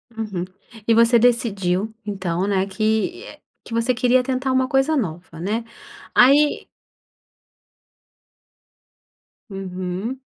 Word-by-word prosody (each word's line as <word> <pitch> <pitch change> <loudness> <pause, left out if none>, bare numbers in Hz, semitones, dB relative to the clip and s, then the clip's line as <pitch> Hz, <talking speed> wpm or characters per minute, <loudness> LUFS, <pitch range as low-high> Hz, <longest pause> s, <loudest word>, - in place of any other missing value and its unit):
Uhum. 205 -6 -4 0.4
E 230 - +5
você 230 +1 +5
decidiu, 215 -4 +1
então, 190 -3 -2
né, 195 -1 +1
que 220 - -2 0.2
que - - -10
você 230 +2 +1
queria 250 +1 +3
tentar 260 0 -1
uma 260 0 +2
coisa 270 +4 +2
nova, 175 - -4
né. 220 +5 -2 0.5
Aí 285 +4 +5 2.8
Uhum. 190 +5 -5
225 Hz, 100 wpm, -21 LUFS, 190-255 Hz, 2.8 s, E